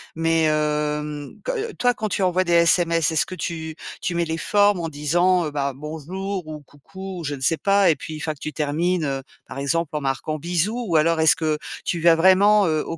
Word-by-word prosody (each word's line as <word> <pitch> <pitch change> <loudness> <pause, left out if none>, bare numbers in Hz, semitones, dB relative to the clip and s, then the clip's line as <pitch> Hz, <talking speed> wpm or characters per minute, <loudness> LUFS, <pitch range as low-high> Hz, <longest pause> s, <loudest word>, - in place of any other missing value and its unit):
Mais 165 0 +1
hem, 150 -1 -1
que, - - -2 0.2
heu - - -15
toi 245 0 +1
quand 220 -2 -3
tu 200 - -2
envoies 185 0 +2
des 170 - 0
SMS, 170 -1 +3
est-ce 160 - +1
que 185 - -8
tu 160 -3 -5 0.3
tu 175 - -2
mets 170 - +1
les 160 0 -3
formes 205 0 +2
en 165 - -3
disant, 175 +5 +1
heu, 150 - -4
bah: 140 -2 -2
«Bonjour» 165 +5 -5
ou 155 -1 -7
«Coucou» 185 +7 -10
ou - - -7
je 145 0 -2
ne 130 - -12
sais 160 +5 +1
pas 200 -3 +3
et 155 - +2
puis 160 - -8
une 155 - -7
fois 155 -1 -2
que 140 - -21
tu 155 - -6
termines, 165 +3 0
heu, 135 -2 -2 0.2
par 130 - -8
exemple 155 +3 -1
en 150 - -1
marquant: 140 +3 -2
«Bisous» 180 +9 -1
ou 165 - -1
alors 160 +1 +3
est-ce 160 -1 +5
que 155 -1 -1 0.3
tu 170 - -2
vas 165 0 +5
vraiment, 195 +4 +5
heu, 155 -2 +1
au 165 - -5
165 Hz, 235 wpm, -22 LUFS, 150-180 Hz, 0.3 s, est-ce